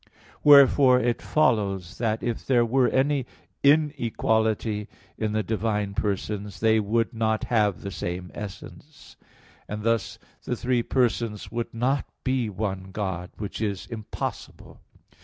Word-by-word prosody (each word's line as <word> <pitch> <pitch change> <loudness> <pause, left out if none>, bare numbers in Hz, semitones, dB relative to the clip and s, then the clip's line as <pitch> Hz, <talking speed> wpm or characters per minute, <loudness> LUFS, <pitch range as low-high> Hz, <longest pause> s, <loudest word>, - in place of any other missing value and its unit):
Wherefore 140 -3 +7
it 120 -1 0
follows, 100 - 0
that 110 -2 -1
if 120 -2 -2
there 120 -3 +3
were 125 +2 +3
any 135 -1 +1 0.3
inequality 115 -7 +1 0.3
in 110 -1 -2
the 110 0 0
divine 105 -2 -1
persons, 100 0 -3
they 110 0 +4
would 110 +2 0
not 110 -1 0
have 105 -5 +1
the 100 - -5
same 90 -1 -5
essence; 105 +8 -10 0.5
and 105 0 -5
thus 115 -2 0 0.3
the - - -2
three 125 -1 0
persons 115 -4 -1
would 115 0 -3
not 130 +5 0 0.2
be 130 -4 0
one 95 -2 -4
God; 95 -3 -3
which 105 0 -5
is 100 -3 -2
impossible. 110 -3 -7
110 Hz, 130 wpm, -25 LUFS, 105-125 Hz, 0.5 s, Wherefore